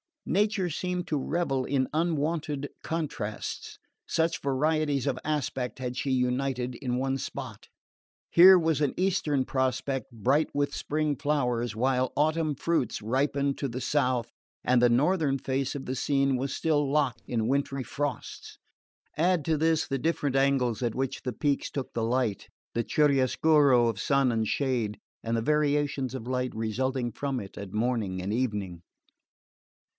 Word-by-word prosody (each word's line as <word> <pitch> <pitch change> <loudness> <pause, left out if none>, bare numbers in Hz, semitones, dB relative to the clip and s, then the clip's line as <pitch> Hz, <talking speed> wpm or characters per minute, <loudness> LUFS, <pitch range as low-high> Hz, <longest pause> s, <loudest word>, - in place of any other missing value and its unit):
Nature 205 -2 +1
seemed 180 +2 -3
to 150 - 0
revel 135 -2 -1
in 130 -1 +1
unwonted 155 -3 -1
contrasts; 140 -10 -4 0.3
such 165 +1 0
varieties 145 0 +1
of 140 - -1
aspect 135 -4 -2
had 125 -1 -4
she 140 - -2
united 125 0 0
in 125 -1 -3
one 135 +1 0
spot. - - -7 0.6
Here 185 +2 +9
was 160 -3 +1
an 145 - +1
eastern 155 -8 +1
prospect 130 -1 -1
bright 130 +7 +1
with 145 0 0
spring 150 -1 -1
flowers, 125 -6 0
while 130 +2 +1
autumn 155 +1 +1
fruits 135 -7 -1
ripened 140 +4 0
to 140 - -1
the 125 +1 -5
south 130 -5 0 0.3
and 125 -1 +3
the 120 - +5
northern 145 +3 +2
face 135 +1 -2
of 140 - -5
the 130 - -3
scene 135 0 +1
was 135 +2 -2
still 150 -3 +1
locked 135 -5 0
in 115 -2 -1
wintry 140 0 0
frosts...Add 150 +4 -4
to 160 -1 +1
this 160 0 +2
the 135 - -2
different 145 -3 0
angles 135 -4 +2
at 120 -3 -1
which 135 0 -2
the 125 - -3
peaks 145 +3 0
took 135 -2 -5
the 115 - -1
light, 115 -4 0 0.3
the 115 - 0
chiaroscuro 140 -2 +4
of 110 -4 -2
sun 135 0 +2
and 110 -1 0
shade, 120 -6 -1 0.2
and 115 0 -1
the - - 0
variations 145 -2 +1
of 120 -3 -6
light 125 -1 -2
resulting 120 +3 -1
from 135 +3 -3
it 100 -3 -9
at 100 -2 -7
morning 105 -5 -1
and 100 +3 -2
evening... 105 -8 -2
135 Hz, 150 wpm, -28 LUFS, 125-150 Hz, 0.6 s, Here